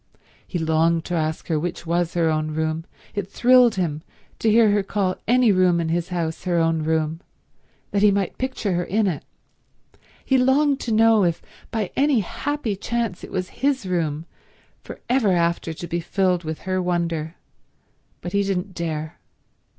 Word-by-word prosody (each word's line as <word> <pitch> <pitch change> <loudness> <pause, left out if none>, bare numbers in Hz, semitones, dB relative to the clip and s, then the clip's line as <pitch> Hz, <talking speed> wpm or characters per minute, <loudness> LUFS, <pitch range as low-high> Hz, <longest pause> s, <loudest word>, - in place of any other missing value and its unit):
He 180 - -3
longed 160 0 +1
to 175 - -4
ask 155 -1 -1
her 160 -3 0
which 175 +2 -4
was 170 +1 0
her 170 -1 +2
own 155 0 -1
room—it 160 +5 -4
thrilled 245 +1 +5
him 160 -5 -2 0.4
to 225 - +2
hear 220 -1 +5
her 205 0 +2
call 195 -1 -1
any 245 -1 +4
room 185 -2 +3
in 165 -1 -1
his 170 +1 -1
house 170 -2 -3
her 175 -1 +1
own 165 -1 +2
room—that 160 +5 -4
he 210 - +6
might 200 -2 -1
picture 255 -6 -2
her 175 0 0
in 210 +4 0
it. 175 -7 -2 1.0
He 265 -1 +3
longed 275 +2 +3
to 235 - -4
know 225 -1 +5
if 170 -2 +1 0.3
by 215 -5 -2
any 275 -4 +3
happy 280 +2 -3
chance 230 -1 -3
it - - -8
was 185 0 -3
his 270 -5 +1
room, 165 -4 -1 0.6
for - - -9
ever 240 -6 +3
after 170 -1 0
to 160 +2 -7
be 170 - -2
filled 180 0 0
with 160 -1 -5
her 185 0 -1
wonder; 170 -2 -2 0.9
but 175 - -6
he 200 - +3
didn't 195 -1 -2
dare. 160 -3 -4
180 Hz, 170 wpm, -23 LUFS, 165-210 Hz, 1.0 s, he